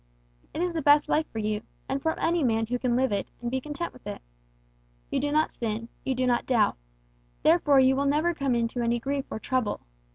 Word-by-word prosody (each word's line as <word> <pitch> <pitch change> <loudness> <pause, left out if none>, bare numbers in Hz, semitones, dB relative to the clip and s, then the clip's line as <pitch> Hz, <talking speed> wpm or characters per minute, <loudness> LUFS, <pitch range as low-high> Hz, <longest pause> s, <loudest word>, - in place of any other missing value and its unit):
It 335 - -2
is 355 -1 -1
the 325 - -1
best 290 +1 +5
life 310 +1 +2
for - - -8
you, 215 -1 -1 0.3
and 270 +1 -2
for 320 +2 -1
any 340 0 +1
man 225 -3 +2
who 245 +2 -2
can 245 -1 +1
live 260 0 +2
it, 200 -1 -1
and 240 0 -4
be 260 0 -1
content 300 +4 -5
with 255 - -14
it. - - -5 0.9
You - - +1
do 290 - -1
not 310 +1 +2
sin, 230 0 -4
you 265 - -1
do 255 +1 0
not 240 -1 +1
doubt; 230 -5 +3 0.7
therefore 310 -4 +5
you 265 0 +5
will 280 +1 +1
never 310 +5 +2
come 275 -5 0
into 235 +1 -1
any 235 0 +1
grief 275 +3 -2
or - - -4
trouble. 250 -1 -1
260 Hz, 225 wpm, -27 LUFS, 235-295 Hz, 0.9 s, best